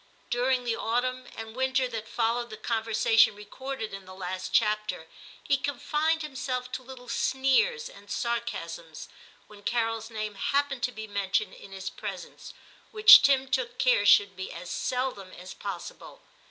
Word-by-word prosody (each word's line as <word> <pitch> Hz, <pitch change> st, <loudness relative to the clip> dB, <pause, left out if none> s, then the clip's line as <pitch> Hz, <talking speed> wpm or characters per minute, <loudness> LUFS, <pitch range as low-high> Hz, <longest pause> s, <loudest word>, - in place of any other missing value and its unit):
During 250 Hz, +1 st, +1 dB
the 235 Hz, -2 st, 0 dB
autumn 250 Hz, +3 st, -1 dB
and 225 Hz, 0 st, -7 dB
winter 260 Hz, 0 st, +1 dB
that 225 Hz, -2 st, -6 dB
followed 235 Hz, +1 st, 0 dB
the 215 Hz, -, -8 dB
conversation 220 Hz, -1 st, +3 dB
recorded 220 Hz, +2 st, -6 dB
in 195 Hz, -1 st, -8 dB
the 185 Hz, 0 st, -11 dB
last 185 Hz, 0 st, -5 dB
chapter 210 Hz, -6 st, +1 dB, 0.4 s
he 280 Hz, -, +2 dB
confined 300 Hz, +4 st, 0 dB
himself 255 Hz, -3 st, -4 dB
to -, -, -4 dB
little 255 Hz, -1 st, -12 dB
sneers 430 Hz, -, +1 dB
and -, -, -15 dB
sarcasms 170 Hz, -, -4 dB, 0.4 s
when 210 Hz, -1 st, -15 dB
Carol's 225 Hz, 0 st, -1 dB
name 215 Hz, -2 st, -4 dB
happened 275 Hz, +5 st, 0 dB
to 245 Hz, +1 st, 0 dB
be 220 Hz, -2 st, -7 dB
mentioned 200 Hz, -1 st, -1 dB
in 195 Hz, -, -13 dB
his 190 Hz, 0 st, -6 dB
presence, -, -, -8 dB, 0.3 s
which 430 Hz, -1 st, +10 dB
Tim 270 Hz, -1 st, +3 dB
took 255 Hz, -2 st, -1 dB
care 250 Hz, -5 st, +3 dB
should 205 Hz, -1 st, +5 dB
be 190 Hz, 0 st, -6 dB
as 175 Hz, +1 st, -8 dB
seldom 250 Hz, -7 st, -2 dB
as 180 Hz, +1 st, -9 dB
possible. -, -, -8 dB
235 Hz, 155 wpm, -28 LUFS, 205-260 Hz, 0.4 s, which